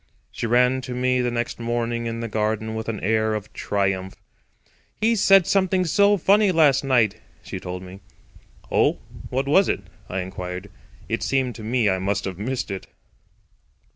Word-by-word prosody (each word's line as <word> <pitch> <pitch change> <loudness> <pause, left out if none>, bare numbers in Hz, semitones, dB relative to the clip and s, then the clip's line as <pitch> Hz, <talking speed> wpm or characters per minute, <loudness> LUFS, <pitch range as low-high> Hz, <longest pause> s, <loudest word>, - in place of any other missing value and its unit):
She - - -3
ran 125 +2 +3
to 125 -1 -6
me 125 0 +1
the 125 - 0
next 120 0 -3
morning 120 0 -2
in 115 0 -4
the 115 - -3
garden 110 0 -1
with 110 0 -4
an 110 -3 -3
air 110 +1 +1
of 105 0 -6
triumph. 95 -2 -1 0.8
"He 230 +2 +3
said 195 -3 +5
something 190 -1 +2
so 200 +4 +4
funny 200 +3 +4
last 150 -6 +4
night," 115 -6 +2 0.3
she - - -6
told 90 0 -6
me. 95 +1 -11 0.7
"Oh, - - +3 0.3
what 135 +2 -1
was 190 +7 +4
it?" - - 0 0.3
I 95 +1 -2
inquired. 90 +1 -6 0.4
It - - -2
seemed 130 -2 0
to 110 - -10
me 115 0 +1
I 95 -1 +1
must 100 +2 -1
have 95 -1 -5
missed 125 0 -3
it. 95 - -6
115 Hz, 170 wpm, -23 LUFS, 100-135 Hz, 0.8 s, said